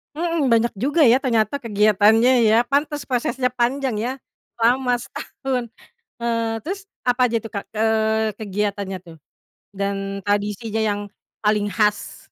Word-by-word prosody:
Hmm, 330 Hz, -4 st, 0 dB
banyak 230 Hz, +1 st, +3 dB
juga 285 Hz, -, +2 dB
ya 245 Hz, +3 st, +5 dB
ternyata 255 Hz, +2 st, 0 dB
kegiatannya 215 Hz, +2 st, +4 dB, 0.2 s
ya. 220 Hz, -, +5 dB
Pantas 290 Hz, +2 st, -1 dB
prosesnya 250 Hz, 0 st, 0 dB
panjang 255 Hz, 0 st, 0 dB
ya. 245 Hz, +3 st, -1 dB, 0.5 s
Lama, 245 Hz, +2 st, +2 dB
setahun. 255 Hz, -1 st, -5 dB, 0.5 s
Eee, 230 Hz, -1 st, -1 dB
terus 390 Hz, +2 st, -5 dB, 0.2 s
apa 245 Hz, +1 st, +2 dB
aja 230 Hz, -1 st, -1 dB
tuh, 225 Hz, -, -9 dB
Kak, 200 Hz, -, -3 dB
eee, 220 Hz, -1 st, +1 dB
kegiatannya 200 Hz, -2 st, -2 dB
tuh 165 Hz, -1 st, -13 dB, 0.6 s
dan, 195 Hz, 0 st, -3 dB
tradisinya 205 Hz, +2 st, -1 dB
yang 205 Hz, 0 st, -1 dB, 0.4 s
paling 210 Hz, -1 st, +2 dB
khas? 210 Hz, -1 st, 0 dB
225 Hz, 130 wpm, -22 LUFS, 210-255 Hz, 0.6 s, ya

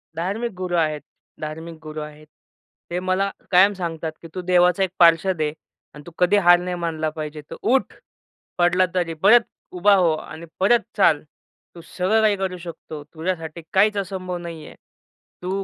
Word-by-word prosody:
धार्मिक 200 Hz, +8 st, -3 dB
गुरु 180 Hz, -1 st, -3 dB
आहेत, 155 Hz, -2 st, 0 dB, 0.4 s
धार्मिक 160 Hz, +2 st, -6 dB
गुरु 155 Hz, 0 st, -6 dB
आहेत. 150 Hz, 0 st, -10 dB, 0.6 s
ते 175 Hz, -, -1 dB
मला 185 Hz, +2 st, 0 dB, 0.2 s
कायम 190 Hz, +3 st, +6 dB
सांगतात, 165 Hz, -4 st, -4 dB
की 165 Hz, -, -10 dB
तू 185 Hz, -, -3 dB
देवाचा 180 Hz, +1 st, +3 dB
एक 190 Hz, -, 0 dB
पार्षद 170 Hz, +1 st, +4 dB
आहे 150 Hz, -1 st, 0 dB, 0.4 s
आणि 150 Hz, -, -12 dB
तू -, -, -9 dB
कधी 180 Hz, +3 st, +4 dB
हार 175 Hz, 0 st, +8 dB
नाही 180 Hz, 0 st, -3 dB
मानला 160 Hz, -2 st, -2 dB
पाहिजे. 155 Hz, -1 st, -6 dB
"तर -, -, -5 dB
उठ, 260 Hz, +3 st, +1 dB, 0.6 s
पडला 180 Hz, +1 st, +3 dB
तरी 175 Hz, -2 st, 0 dB
परत 230 Hz, +5 st, +8 dB, 0.3 s
उभा 200 Hz, +3 st, +4 dB
हो 180 Hz, -4 st, +3 dB
आणि 155 Hz, +1 st, -8 dB
परत 210 Hz, +6 st, +4 dB, 0.2 s
चाल." 155 Hz, -7 st, +4 dB, 0.5 s
तू 170 Hz, -, -10 dB
सगळं 190 Hz, +6 st, 0 dB
काही 215 Hz, -2 st, +3 dB
करू 190 Hz, -1 st, -3 dB
शकतो. 165 Hz, -3 st, -9 dB
तुझ्यासाठी 165 Hz, +1 st, -5 dB
काहीच 205 Hz, +2 st, +4 dB
असंभव 185 Hz, -2 st, -4 dB
नाही 170 Hz, -3 st, -8 dB
आहे. -, -, -12 dB, 0.7 s
तू 190 Hz, +2 st, -2 dB
175 Hz, 170 wpm, -22 LUFS, 160-190 Hz, 0.7 s, हार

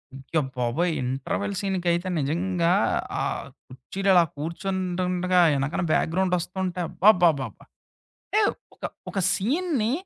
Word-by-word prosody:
అయ్యా 135 Hz, +4 st, -2 dB, 0.2 s
బాబోయ్! 145 Hz, +9 st, +1 dB
ఇంటర్వెల్ 135 Hz, +11 st, -2 dB
సీనుకైతే 180 Hz, -2 st, 0 dB
నిజంగా 170 Hz, +4 st, 0 dB, 0.5 s
ఆహ్, -, -, -2 dB, 0.2 s
కూర్చీలు 160 Hz, +10 st, -4 dB
అలా 175 Hz, -1 st, +7 dB
కూర్చుంటుంటడగా 180 Hz, +2 st, 0 dB, 0.2 s
ఎనకనా 140 Hz, +5 st, -1 dB
బ్యాక్‌గ్రౌండ్ 180 Hz, +2 st, +1 dB
వస్తుంటే 180 Hz, +1 st, -3 dB
అబ్బబ్బబాబ్బా! 175 Hz, -9 st, +3 dB, 0.8 s
ఏవ్ 410 Hz, -, +2 dB, 0.2 s
ఒక -, -, -23 dB, 0.3 s
ఒక 195 Hz, -, -2 dB
సీన్‌ని, 260 Hz, -, 0 dB
180 Hz, 100 wpm, -25 LUFS, 165-190 Hz, 0.8 s, అలా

